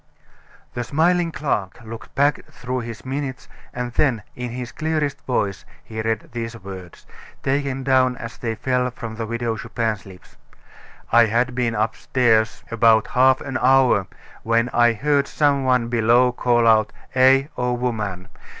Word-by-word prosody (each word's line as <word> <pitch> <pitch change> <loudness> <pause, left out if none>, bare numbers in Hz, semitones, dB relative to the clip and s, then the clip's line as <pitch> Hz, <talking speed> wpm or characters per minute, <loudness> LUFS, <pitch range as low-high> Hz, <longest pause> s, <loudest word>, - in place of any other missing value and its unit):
The 120 - -3
smiling 170 +5 +1
clerk 125 -12 -2
looked 115 +1 -10
back 140 +2 +2
through 125 +1 -4
his 115 -1 -8
minutes 135 -1 -4 0.2
and 125 0 -4
then, 125 -7 +1
in 125 0 -5
his 125 0 -6
clearest 155 -3 -2
voice, 105 -6 -1 0.2
he 110 0 -6
read 110 0 -2
these 115 0 -5
words, 95 -2 -10 0.4
taken 135 -1 -1
down 130 -1 +2
as 115 +1 -8
they 115 -2 -3
fell 125 +1 0
from 115 -2 -8
the 115 0 -5
Widow 115 0 -2
Chupin's 110 -3 -3
lips: 95 -1 -15 0.7
"I 120 0 +6
had 120 +3 +1
been 120 -2 -1
upstairs 110 +1 +1
about 115 -1 +4
half 130 0 +4
an 135 -2 -3
hour, 130 -6 +4 0.3
when 115 +1 +1
I 120 -1 +3
heard 140 +4 +1
some 140 -3 +1
one 125 -2 +2
below 120 +2 +3
call 120 -1 +1
out 110 -1 +4 0.2
'Eh! 130 +1 +5
old 125 0 -1
woman. 105 -7 -3
120 Hz, 150 wpm, -22 LUFS, 115-130 Hz, 0.7 s, I